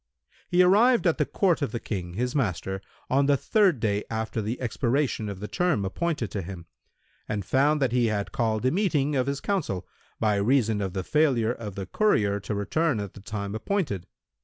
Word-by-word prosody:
He 180 0 +5
arrived 220 +6 +5
at 170 - +2
the 150 - +2
court 185 -6 +1
of 140 - -1
the 120 - -3
King, 90 -6 -5
his 125 +4 -1
master, 95 - -1 0.3
on 140 +1 +2
the 145 -1 +4
third 195 - +3
day 105 -2 0
after 110 0 -2
the 110 +4 -3
expiration 120 -1 0
of 100 -2 -6
the 105 - -5
term 175 - 0
appointed 145 - -2
to 100 - -3
him, 90 -1 -8 0.6
and 105 -3 -2
found 145 - +3
that 130 - +1
he 120 -1 +2
had 105 -2 -2
called 110 0 0
a 130 - +4
meeting 155 -7 +1
of 130 -1 +1
his 140 0 -1
council, 155 - -2 0.3
by 105 -2 +2
reason 110 -1 +2
of 95 -2 -3
the 95 -1 -2
failure 125 -4 +2
of 105 -5 -7
the 95 - -4
courier 100 - +2
to 105 +2 -4
return 140 +6 0
at 100 -2 -5
the 100 - -12
time 100 -1 -5
appointed. 110 - -2
115 Hz, 200 wpm, -26 LUFS, 100-150 Hz, 0.6 s, He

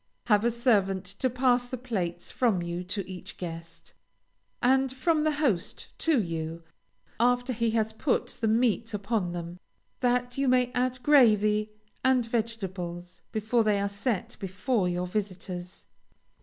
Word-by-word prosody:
Have 210 -2 +4
a 235 - +4
servant 205 -6 +2
to 200 +7 -2
pass 250 0 +2
the 255 - -4
plates 185 -9 -3
from 220 -9 +1
you 170 +1 -3
to 195 +1 -3
each 185 -2 -9
guest, 165 -1 -8 0.7
and 265 +1 +3
from 305 +4 +1
the 310 0 +2
host 265 - -1
to 320 -5 +3
you, 165 -3 -3 0.6
after 245 +1 +2
he 230 0 +1
has 220 0 0
put 245 +4 0
the 225 - +2
meat 225 0 +1
upon 200 -3 -1
them, 175 0 -6 0.4
that 245 +1 0
you 275 - +2
may 250 -1 +3
add 255 0 -1
gravy 215 -7 +5 0.3
and 260 -2 +3
vegetables 190 -7 -4
before 220 +2 +1
they 210 -2 +2
are 200 - 0
set 200 +1 -2
before 195 +1 0
your 175 0 -1
visitors. 180 -2 -5
220 Hz, 145 wpm, -28 LUFS, 185-245 Hz, 0.7 s, gravy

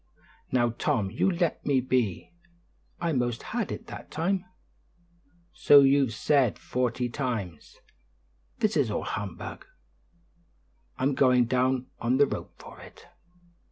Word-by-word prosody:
"Now, 120 -2 +2
Tom, 100 -4 0
you 120 - +1
let 175 -2 -1
me 140 -2 +2
be; 125 -8 -1 0.7
I 170 -1 -1
'most 120 -3 -1
had - - -3
it - - -6
that - - -10
time!" 180 +4 -1 1.1
"So 145 -1 +7
you've 135 -4 +3
said 135 -3 +2
forty 125 -1 -2
times. 115 - -5 0.8
This 215 0 0
is 140 -7 +2
all 105 - -2
humbug; 100 -5 -6 1.3
I'm 135 +2 +1
going 125 -2 +4
down 130 +1 +1
on 120 +2 +1
the 145 - +6
rope - - -6
for - - -13
it." - - -15
130 Hz, 125 wpm, -27 LUFS, 120-140 Hz, 1.3 s, So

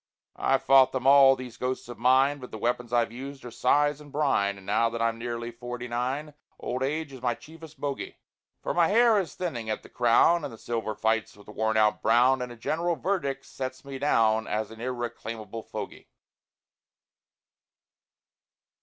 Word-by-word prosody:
I've 135 0 +2
fought 135 -1 +6
them 130 -1 -3
all, 135 -1 +7
these 125 -3 -9
ghosts 125 +1 -3
of 120 -3 -9
mine, 135 +4 +4
But 125 - -9
the - - -7
weapons 120 +1 -2
I've 120 -2 +2
used 135 +2 -8
are 120 - -7
sighs 145 +4 +2
and 145 -1 -14
brine, 115 -10 +1
And 95 - -14
now 110 +3 +2
that 115 0 -5
I'm 115 0 0
nearly 120 0 -4
forty 120 +1 -7
nine, 130 +6 -3 0.3
Old 125 +1 -3
age 145 +2 -2
is 130 - -10
my 120 -2 0
chiefest 160 +2 -14
bogy; 140 -1 -4 0.5
For - - -1
my 170 -1 +4
hair 225 +1 +5
is 185 - -4
thinning 120 -12 -4
away - - +2
at - - -8
the - - -14
crown, 125 +8 +4
And - - -4
the 115 - -11
silver 115 -2 -3
fights 110 -1 -1
with 100 - -16
the - - -11
worn 110 +1 0
out 105 -1 +3
brown; 125 +3 +4
And 125 -1 -4
a - - -9
general 165 +9 -1
verdict 140 -8 -2
sets 130 0 -6
me 135 -1 -7
down 110 -6 +2
As 110 0 -2
an 110 0 -11
irreclaimable 115 -3 -5
fogy. - - -8
125 Hz, 190 wpm, -27 LUFS, 115-140 Hz, 0.5 s, all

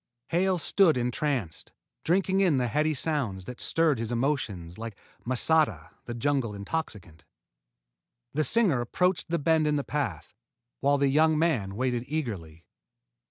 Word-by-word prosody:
Hale 185 +2 +2
stood 170 -1 +3
entranced, 125 - -2 0.3
drinking 190 +2 +2
in 175 -8 +3
the 125 -1 +1
heady 150 +6 +1
sounds 125 - -1
that 125 - -6
stirred 160 -6 +2
his 115 0 -3
emotions 115 - -2
like 115 -3 -7 0.3
masata, 125 - +1
the 120 - -5
jungle 120 -3 0
intoxicant. 100 - -5 1.1
The 155 - +1
singer 170 - +3
approached 180 +7 0
the 170 - +1
bend 160 0 +2
in 150 - +2
the 145 - 0
path, 110 - -3 0.5
while 140 +1 +2
the 140 0 +2
young 155 +2 +3
man 130 - 0
waited 125 0 -1
eagerly. 100 - -5
140 Hz, 140 wpm, -27 LUFS, 110-160 Hz, 1.1 s, stood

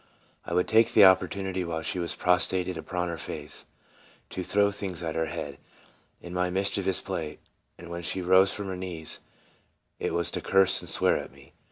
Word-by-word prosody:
I - - -2
would 90 - +2
take 115 +1 +4
the 105 - +8
opportunity 95 0 +3
while 80 -2 -3
she 90 - -2
was 85 -1 -2
prostrated 90 0 +2
upon 90 +2 -3
her 85 -2 -4
face, 75 0 -6 0.6
to 95 - -4
throw 100 +2 +2
things 95 -4 -5
at 80 -1 -2
her 80 0 -1
head, 75 -3 -6 0.6
in 85 - -8
my 90 0 0
mischievous 95 0 0
play, 80 -6 -4 0.4
and 85 - -11
when 85 0 -5
she 85 - -3
rose 95 +2 +5
from 100 - -5
her 95 - -3
knees, 90 -4 -5 0.8
it - - -2
was 85 0 +1
to - - -3
curse 95 -1 +3
and 90 - -8
swear - - +3
at - - -8
me. 70 +1 -18
90 Hz, 190 wpm, -27 LUFS, 85-95 Hz, 0.8 s, the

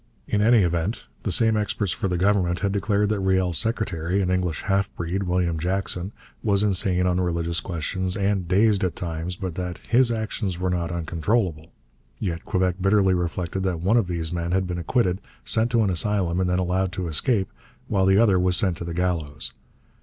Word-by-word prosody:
In 105 - +1
any 115 -1 +5
event, 85 +5 -1 0.2
the 100 - -2
same 110 +5 +3
experts 105 -2 -1
for - - -2
the 90 -1 -1
Government 90 -2 +1
had 100 -2 +1
declared 100 +1 +1
that 105 -1 0
Riel's 95 -4 +1
secretary, 100 -5 -1
an 90 - 0
English 90 -4 -1
half 100 0 +1
breed, 90 +3 -2
William 90 -3 0
Jackson, 90 +1 -2 0.3
was 100 -2 +2
insane 95 -2 +1
on 90 0 +1
religious 85 -1 -1
questions, 90 +2 -3
and 100 -2 0
dazed 100 +2 +3
at 90 - -1
times, 85 +1 -4
but 95 -2 -5
that 90 0 -4
'his 125 +1 +2
actions 110 -4 -2
were 90 0 -1
not 85 -1 -1
uncontrollable'; 85 0 -1 0.5
yet 85 -5 -3
Quebec 90 -2 0
bitterly 95 -1 +4
reflected 90 +1 -2
that 95 -3 -1
one 100 +6 +2
of 115 -6 +3
these 85 -1 -2
men 85 0 -2
had 95 0 +2
been 90 -1 -3
acquitted, 95 +1 0 0.2
sent 115 +1 +2
to 115 -2 +3
an 100 - +1
asylum 90 0 0
and 90 -1 +1
then 90 - +1
allowed 90 +1 0
to 95 -3 -3
escape, 95 - 0 0.4
while 95 -3 +2
the 95 0 +5
other 100 -4 +4
was 90 -1 +2
sent 95 -5 +1
to - - -6
the 85 0 -5
gallows. 85 -5 -2
90 Hz, 195 wpm, -24 LUFS, 85-100 Hz, 0.5 s, any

